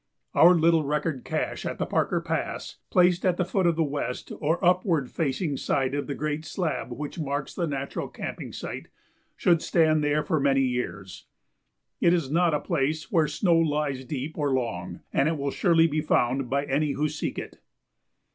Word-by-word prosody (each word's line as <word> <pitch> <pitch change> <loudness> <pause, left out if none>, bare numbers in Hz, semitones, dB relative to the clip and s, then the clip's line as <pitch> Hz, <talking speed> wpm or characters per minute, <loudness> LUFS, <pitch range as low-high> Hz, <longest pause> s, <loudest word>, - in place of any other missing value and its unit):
Our 175 +2 +7
little 165 -1 +4
record 150 -1 -1
cache - - -3
at - - -4
the - - -1
Parker - - 0
Pass, - - -3
placed 180 0 +3
at 180 -2 +2
the 180 - +1
foot 185 0 +1
of 170 - +2
the 165 - +2
west 140 -4 -4
or 160 +3 +1
upward 175 - +2
facing 145 0 -1
side 135 -1 0
of 145 0 -2
the 140 - -3
great 150 +2 -2
slab 160 -5 -3
which 145 +6 -6
marks 140 -2 -3
the 170 - -1
natural 140 -2 -3
camping - - -6
site, - - -6 0.5
should 170 -2 +3
stand 155 -2 +3
there 150 +1 +1
for 160 - 0
many 135 -1 +3
years. 125 -7 -4 0.7
It 170 - +4
is 150 -6 -2
not 170 -1 +3
a - - 0
place 155 -1 -1
where 165 -6 +3
snow 165 +3 +2
lies 150 -4 0
deep 145 +4 -5
or 145 -2 +1
long, 90 -9 -3
and 140 +3 +3
it 160 - -1
will 140 0 -2
surely 165 0 +4
be 155 -1 0
found 130 -3 +1
by 140 +2 0
any 145 +1 0
who 150 +1 0
seek 150 0 -4
it. - - -7
150 Hz, 185 wpm, -26 LUFS, 140-165 Hz, 0.7 s, Our